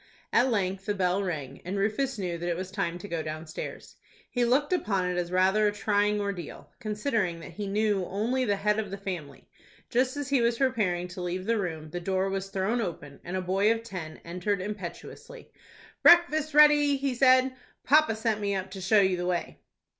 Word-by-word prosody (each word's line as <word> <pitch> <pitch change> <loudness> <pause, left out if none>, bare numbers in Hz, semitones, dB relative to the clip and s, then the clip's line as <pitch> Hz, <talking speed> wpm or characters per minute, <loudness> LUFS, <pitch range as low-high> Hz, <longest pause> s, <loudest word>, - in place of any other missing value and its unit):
At 245 +3 +4
length 195 -4 -1
the 205 - 0
bell 185 0 +1
rang, 145 -8 -4
and 185 +3 -4
Rufus 220 +6 0
knew 180 -4 -3
that 175 +1 -3
it 170 - -1
was 185 0 -5
time 190 -4 -2
to 180 - -9
go 170 -4 -2
downstairs. 155 +1 -7 0.3
He 245 - +1
looked 275 +7 +2
upon 200 - 0
it 180 0 -1
as 175 0 -2
rather 190 +3 +3
a - - +2
trying 210 0 +1
ordeal, 200 -3 -5
considering 210 -5 -1
that - - -9
he 205 -1 -5
knew 205 -2 +1
only 235 +7 -1
the 205 -5 +1
head 210 +2 +1
of 210 -3 -3
the 195 - -5
family. 180 -7 -7 0.4
Just 255 +3 +1
as 285 -1 -4
he 275 -3 +3
was 235 0 +2
preparing 205 -10 0
to 180 0 -7
leave 180 +1 -3
the 230 0 +1
room, 160 -5 -4
the 175 - -3
door 190 +2 0
was 195 0 -3
thrown 200 +5 0
open, 150 -8 -6
and 180 +2 -4
a - - -1
boy 195 +4 +2
of 230 0 -1
ten 180 -8 -7
entered 180 +4 -2
impetuously. 210 - -8 0.5
"Breakfast's 310 -3 +5
ready," 295 -1 +6
he 275 -1 -1
said; 255 +1 +4 0.3
"Pa 300 +4 +6
pa 225 - -2
sent 220 -1 -1
me 200 -1 0
up 190 0 -4
to 190 -1 -7
show 205 +3 +4
you 190 -2 +2
the 175 0 -2
way." 175 -1 -2
200 Hz, 205 wpm, -28 LUFS, 180-230 Hz, 0.5 s, ready